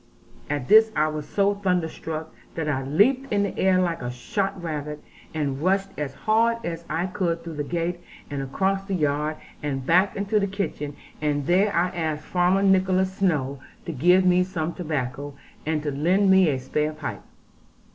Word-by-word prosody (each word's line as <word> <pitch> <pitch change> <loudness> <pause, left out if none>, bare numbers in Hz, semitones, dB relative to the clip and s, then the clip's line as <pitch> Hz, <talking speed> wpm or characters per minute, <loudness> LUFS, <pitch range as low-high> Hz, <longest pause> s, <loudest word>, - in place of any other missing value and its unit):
At 145 -3 -2
this 220 +1 +7
I 155 +1 +2
was 150 -1 -5
so 200 0 +2
thunderstruck, 165 -5 -2 0.2
that 160 -2 -2
I 140 -3 0
leaped 240 - +2
in 205 -1 +2
the 200 - -3
air 190 -1 +3
like 170 -2 0
a 125 - -3
shot 190 +11 -2
rabbit, 150 -3 -4 0.3
and 145 -3 -2
rushed 195 +3 +1
as 140 -2 -4
hard 230 +2 +2
as 170 0 -4
I 165 +3 0
could 175 -3 -2
through 165 -2 -7
the 145 - -1
gate 170 +3 -2 0.3
and 140 -2 -4
across 190 +9 0
the 195 -1 -2
yard, 150 -1 0 0.2
and 135 -3 -3
back 180 +6 +3
into 205 +2 +1
the 200 - 0
kitchen; 165 -7 -4 0.3
and 145 -2 0
there 190 +5 +3
I 175 0 +2
asked 160 -4 -3
Farmer 180 +2 +2
Nicholas 190 -1 +3
Snowe 140 -8 0 0.3
to - - -3
give 180 +7 +4
me 180 0 +5
some 170 -3 -3
tobacco, 145 -4 -4 0.3
and 155 -1 0
to 150 - -1
lend 180 +8 +3
me 190 -3 +6
a 135 - 0
spare 150 +4 -1
pipe. 155 0 -6
170 Hz, 180 wpm, -25 LUFS, 150-190 Hz, 0.3 s, this